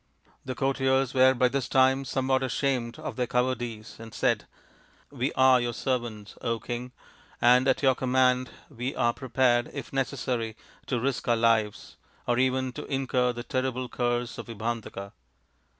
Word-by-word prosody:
3 - - -30
' - - -38
The 130 -1 -4
courtiers 135 -1 +1
were, 130 0 +5
by 125 +1 +4
this 130 -1 -2
time, 130 +1 +3
somewhat 130 0 0
ashamed 130 -3 -1
of - - -6
their 125 -1 0
cowardice 120 -3 -2
and 115 -1 -10
said, - - +1 0.3
" - - -30 0.3
We 135 0 -1
are 130 -1 +5
your 120 -1 -2
servants, 120 -6 -3 0.3
King, 120 +1 -5 0.5
and 125 +2 +5
at 130 +2 +2
your 135 -1 +5
command 130 0 +2 0.2
we 125 +4 -5
are 120 0 +2
prepared, 125 -2 +1
if - - -7
necessary, 125 -4 -2 0.3
to 125 - 0
risk 130 +1 -2
our 120 - +4
lives, 115 -2 +1 0.3
or 120 0 +2
even 130 0 +1
to 150 - -7
incur 130 -2 0
the 120 0 -6
terrible 130 0 -2
curse 120 -1 -2
of - - -7
Vibhandaka." 110 -3 -5
125 Hz, 165 wpm, -27 LUFS, 120-130 Hz, 0.5 s, were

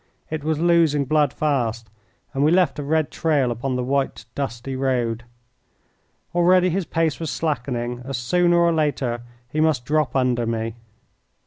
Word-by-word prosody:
It 155 -2 -3
was 155 0 0
losing 165 -4 +3
blood 150 0 +2
fast, 115 -7 -1 0.4
and 135 0 0
we 150 - +5
left 180 -3 +2
a - - -3
red 155 +1 0
trail 145 -7 +1
upon 125 +3 -2
the 125 - -1
white, 135 +1 -1
dusty 130 -1 -4
road. 120 -3 -1 1.1
Already 180 +1 +4
his 190 +1 -1
pace 165 -2 0
was 160 -2 -3
slackening, 125 -6 -2
and 135 +1 -4
sooner 175 +8 +2
or 170 0 +4
later 140 -6 0 0.3
he 155 +5 -1
must 155 -6 +1
drop 150 0 0
under 125 -3 +1
me. 115 0 -2
140 Hz, 155 wpm, -22 LUFS, 125-160 Hz, 1.1 s, we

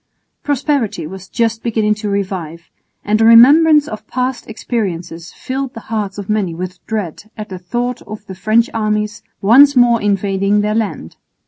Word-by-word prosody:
Prosperity 275 - -1
was 190 +3 -10
just 225 -1 -1
beginning 215 -2 0
to 210 0 -5
revive, 180 -5 -4 0.3
and 215 +1 +1
a - - +5
remembrance 290 +6 +7
of 215 -3 -8
past 255 -1 -3
experiences 180 -7 -4
filled 265 0 -5
the - - -6
hearts 205 -3 -3
of 200 -2 -6
many 205 -6 -1
with 180 +1 -7
dread 210 -1 -5
at 215 0 -7
the 185 -2 -7
thought 240 +7 -3
of 215 0 -9
the 190 - -8
French 215 +5 +1
armies 215 0 -2 0.2
once 275 +7 +6
more 240 -2 +4
invading 200 0 +1
their 210 +1 -1
land. 210 - -3
215 Hz, 160 wpm, -16 LUFS, 195-235 Hz, 0.3 s, remembrance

